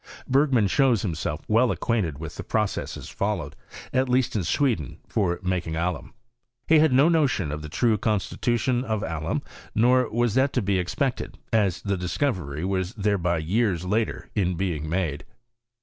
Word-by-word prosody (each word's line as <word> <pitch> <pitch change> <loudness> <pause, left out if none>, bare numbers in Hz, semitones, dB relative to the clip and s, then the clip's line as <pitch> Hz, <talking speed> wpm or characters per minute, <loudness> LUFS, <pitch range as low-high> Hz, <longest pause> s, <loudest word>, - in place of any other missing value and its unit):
Bergman 130 -5 +3
shows 125 0 +3
tumiself 80 -4 -3
well 115 +3 +4
acquainted 100 -14 -1
with 80 0 -7
the - - -6
processes 105 -2 -2
followed, - - -3 0.4
at 130 0 +2
least 125 -1 +1
in 100 - 0
Sweden, 110 - 0
for 90 -5 0
making 90 -3 -1
alum. 85 +1 -3 0.5
He 160 -1 +6
had 155 -2 +4
no 135 +5 +5
notion 140 - +2
of 75 +1 -4
the 75 - -7
true 110 +5 +2
constitution 120 +4 0
of 110 -4 -2
alum; 80 0 -2 0.3
nor 125 +2 +4
was 120 -1 +1
that 130 +3 +2
to 125 - +1
be 100 -1 +1
expected, 130 - -2 0.2
as 100 -6 +2
the 100 -1 0
discovery 90 - -2
was 95 +2 -1
thereby 100 -5 +1
years 90 +2 0
later 110 +4 -1
in 90 -4 0
being 80 -4 -2
made. 80 -5 -1
100 Hz, 160 wpm, -25 LUFS, 85-125 Hz, 0.5 s, He